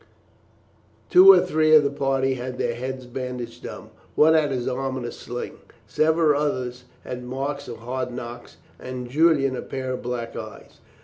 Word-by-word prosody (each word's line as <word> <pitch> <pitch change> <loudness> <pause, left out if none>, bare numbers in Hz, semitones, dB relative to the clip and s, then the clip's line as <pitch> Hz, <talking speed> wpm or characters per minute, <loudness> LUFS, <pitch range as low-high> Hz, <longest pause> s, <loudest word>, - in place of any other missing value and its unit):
Two 370 +2 +10
or - - +7
three 155 0 +3
of 150 - +7
the 140 - 0
party 135 -1 0
had 125 0 -5
their 120 - -1
heads 130 +2 -5
bandaged 125 -1 -6
up; - - -10 0.2
one 160 +1 +6
had 155 -2 +3
his 125 -3 -2
arm 130 +1 -2
in 125 - -5
a 120 - -4
sling; 120 0 -7 0.3
several 155 +4 +2
others 125 -4 -3 0.2
had 125 0 -6
marks 140 +3 -4
of 120 - -7
hard 125 +2 -4
knocks, 120 -1 -8 0.2
and 125 -1 -7
Julian 145 -3 +3
a - - -4
pair 130 -1 -5
of 130 - -4
black 120 -1 -4
eyes. - - -9
130 Hz, 175 wpm, -24 LUFS, 125-145 Hz, 0.3 s, Two